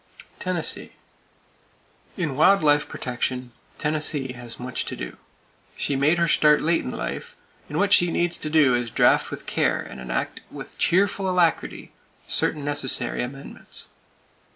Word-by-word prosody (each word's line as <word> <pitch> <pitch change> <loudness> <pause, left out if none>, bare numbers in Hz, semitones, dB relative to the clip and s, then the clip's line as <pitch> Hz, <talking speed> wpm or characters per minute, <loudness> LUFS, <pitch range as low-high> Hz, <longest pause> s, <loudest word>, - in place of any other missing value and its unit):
Tennessee: 180 -3 -1 1.2
In 160 -8 -2
wild 175 +6 +5
life 145 0 +4
protection, 125 0 -3 0.3
Tennessee 150 -3 -1
has 120 -2 -10
much 125 0 -3
to - - -5
do. 60 0 -7 0.6
She 140 - 0
made 145 +5 +3
her 170 0 +2
start 150 -1 +5
late 165 +2 +2
in - - -4
life, 485 0 -5 0.3
and - - -3
what 205 0 +3
she 175 -2 +5
needs 175 0 0
to 155 - -3
do 150 -5 +4
is 120 -1 0
to - - -21
draft - - +4
with - - -8
care - - +1
and 65 - -8
enact 60 -1 -3
with - - -10
cheerful 190 +2 +2
alacrity 175 -4 0 0.3
certain 150 -2 +1
necessary 135 -4 0
amendments. 135 +3 -7
150 Hz, 150 wpm, -24 LUFS, 130-170 Hz, 1.2 s, wild